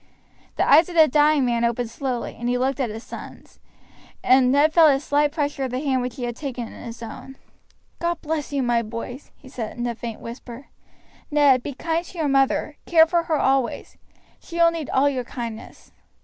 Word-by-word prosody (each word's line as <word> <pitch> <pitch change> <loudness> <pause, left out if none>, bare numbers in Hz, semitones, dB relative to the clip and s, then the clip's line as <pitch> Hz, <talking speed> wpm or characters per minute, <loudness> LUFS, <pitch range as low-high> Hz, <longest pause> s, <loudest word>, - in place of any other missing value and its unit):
The - - +1
eyes 330 +2 +6
of 350 - -8
the 320 -2 +7
dying 295 0 +3
man 235 -1 0
opened 235 0 -1
slowly, 250 -1 -4
and 240 +1 -2
he 250 - +1
looked 265 +1 -1
at 255 -4 0
his 220 +2 -7
sons, - - -11 0.6
and 255 0 +5
Ned 295 +3 +3
felt 325 -2 +7
a 270 -1 +3
slight 290 +1 +1
pressure 290 -3 -2
of - - -3
the 250 +1 -3
hand 265 -3 0
which 250 -1 -4
he 260 - -6
had 240 -1 -3
taken 255 -4 -5
in - - -11
his 235 -1 -8
own. 250 +4 -9 0.6
"God 340 -1 -1
bless 310 -2 -3
you, 280 -2 0
my 240 -1 +2
boys!" 230 +4 -7
he 270 - -17
said, 235 -4 -6
in 240 - -2
a 240 - -1
faint 230 -1 -7
whisper. 240 +2 -10 0.6
"Ned, 285 -4 +4
be 280 +1 -6
kind 330 +4 -1
to 355 - -13
your 315 -3 0
mother; 275 +2 +1
care 320 -2 +6
for 340 0 0
her 315 -2 0
always. 265 -2 0 0.4
She 340 - -12
will 335 0 +5
need 325 -4 -5
all 270 +2 +3
your 260 -3 -1
kindness." 230 -2 -8
270 Hz, 210 wpm, -23 LUFS, 240-300 Hz, 0.6 s, the